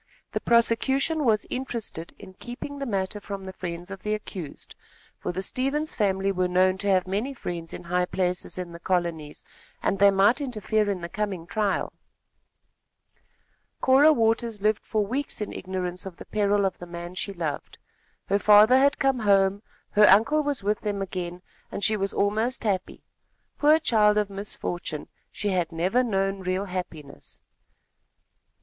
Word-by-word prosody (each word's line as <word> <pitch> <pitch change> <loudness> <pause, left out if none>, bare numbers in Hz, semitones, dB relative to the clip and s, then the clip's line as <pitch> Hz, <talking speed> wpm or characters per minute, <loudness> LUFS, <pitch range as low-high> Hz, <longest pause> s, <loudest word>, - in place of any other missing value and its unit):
The - - -2
prosecution 265 +6 +2
was 215 -3 +2
interested 235 -10 -5
in 190 -2 -12
keeping 245 +7 -8
the 275 - -3
matter 195 -1 -2
from 200 -1 -7
the 190 - -7
friends 175 0 -6
of 195 -1 -7
the 215 0 -1
accused, 185 -7 -7 0.5
for - - -3
the 190 +2 -3
Stevens 275 +8 -1
family 195 -2 +1
were 185 -1 0
known 185 +1 +2
to 205 - -3
have 185 -2 +3
many 210 +9 -2
friends 170 -7 -5
in - - -8
high 180 +1 0
places 180 0 -2
in 180 -2 -5
the 170 - -9
colonies, 170 -4 -2 0.4
and 195 - -1
they 200 0 +7
might 200 +7 +4
interfere 215 -5 0
in 190 -3 -2
the 170 - -4
coming 190 -2 -3
trial. 205 +2 -1 1.9
Cora 275 +4 +6
Waters 225 -3 +1
lived 210 +1 +1
for 215 -2 0
weeks 270 +7 -3
in 210 - -4
ignorance 185 0 -4
of 180 - -9
the - - -10
peril 205 -1 +1
of 190 - -2
the 175 - -8
man 175 +1 -7
she 190 +2 -3
loved. 165 -6 -5 0.5
Her 200 +1 +1
father 215 +5 +7
had 280 +2 +3
come 270 -2 +1
home, 200 -2 +3 0.3
her 210 0 +6
uncle 250 +11 +5
was 290 -6 -2
with 210 +1 0
them 205 -2 -2
again, 180 -1 -5 0.3
and 200 - -5
she 215 - +3
was 195 -1 -1
almost 220 +6 0
happy. 195 -4 -2 0.6
Poor 305 +1 +6
child 215 -9 +3
of 210 -1 0
misfortune, 175 -5 -5 0.2
she 205 - -2
had 180 -3 0
never 180 +9 +1
known 195 -3 0
real 185 +1 -2
happiness. 170 -6 -8
200 Hz, 165 wpm, -26 LUFS, 185-225 Hz, 1.9 s, they